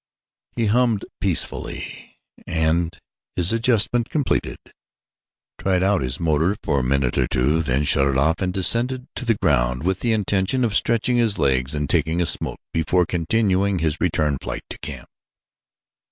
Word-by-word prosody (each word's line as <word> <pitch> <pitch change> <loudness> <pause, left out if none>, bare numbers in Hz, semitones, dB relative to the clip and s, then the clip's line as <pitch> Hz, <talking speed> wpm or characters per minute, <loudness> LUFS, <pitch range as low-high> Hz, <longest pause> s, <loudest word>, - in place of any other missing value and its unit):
He 115 - 0
hummed 115 -1 +1
peacefully - - -2 0.3
and, 80 +1 0 0.4
his 90 +3 +1
adjustment 115 0 +1
completed, 145 -4 -1 1.0
tried 95 -1 0
out 100 -1 +2
his 65 -1 -2
motor 80 +3 +1
for 70 -3 0
a - - -2
minute 65 -1 0
or - - +1
two, 75 +6 +1
then 70 -2 0
shut 70 -1 +3
it 70 -1 0
off 80 +4 +1
and 90 -1 0
descended 120 +7 +2
to 125 - -4
the 115 -2 +2
ground 65 +3 +1
with 95 +1 -1
the 120 - 0
intention 105 +4 0
of 110 -3 0
stretching 120 +2 +2
his 115 -4 +2
legs 65 +1 0
and 75 -1 -2
taking 80 0 +1
a 90 - +1
smoke - - +2 0.2
before 85 +2 +1
continuing 95 +3 0
his 80 -1 -2
return 75 -5 0
flight - - -6
to - - -8
camp. - - -7
90 Hz, 160 wpm, -21 LUFS, 75-110 Hz, 1.0 s, shut